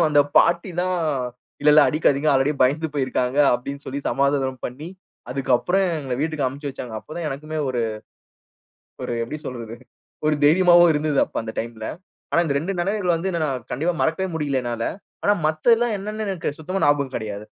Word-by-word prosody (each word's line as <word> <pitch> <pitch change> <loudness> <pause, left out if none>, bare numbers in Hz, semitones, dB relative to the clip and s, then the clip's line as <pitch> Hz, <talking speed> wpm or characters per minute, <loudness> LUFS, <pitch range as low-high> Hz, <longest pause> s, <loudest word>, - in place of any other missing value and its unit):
அப்புறம் 165 - +4
அந்த 145 -1 +5 0.2
பாட்டி 170 +2 +4
தான் 185 0 0 0.7
"இல்ல 150 - +5
இல்ல. 155 - +8
அடிக்காதீங்க 150 -1 +2
ஆல்ரெடி 135 +2 +3
பயந்து 150 +5 +2
போயிருக்காங்க." 130 -1 0 0.2
அப்படின்னு 140 +3 -5
சொல்லி 135 +2 -4
சமாதானம் 135 -1 +1
பண்ணி, 140 +7 -6 0.4
அதுக்கு 135 0 -3
அப்புறம் 195 +8 +1
எங்கள 135 -3 -3
வீட்டுக்கு 155 -2 -1
அனுப்பிச்சி 140 +3 -4
வைச்சாங்க. 125 -3 -8
அப்போதான் 160 +5 -6
எனக்குமே 155 +3 -5
ஒரு 125 -2 -1 1.2
ஒரு - - -3
எப்படி 150 +6 -5
சொல்றது? 115 -3 -6 0.5
ஒரு 155 - +3
தைரியமாவும் 175 +1 +6
இருந்தது 150 -1 +1
அப்ப - - -8
அந்த 110 0 -6
டைம்ல. 115 -1 -5 0.5
ஆனா, 170 - +4
இந்த 140 - -1
2 190 +6 -3
நினைவுகள 195 -1 0
வந்து 170 +4 -2 0.2
நான் 130 -5 -3
கண்டிப்பா 170 +4 0
மறக்கவே 165 +4 +1
முடியல 140 -4 0
என்னால. 120 -1 -3 0.4
ஆனா 205 - +4
மத்தது 155 +10 +3
எல்லாம் 235 0 0
என்னன்னு 215 +2 -4
எனக்கு 185 -5 -2
சுத்தமா 185 +5 -3
ஞாபகம் 140 -2 +1
கிடையாது. 105 -2 -4
150 Hz, 170 wpm, -23 LUFS, 130-170 Hz, 1.2 s, இல்ல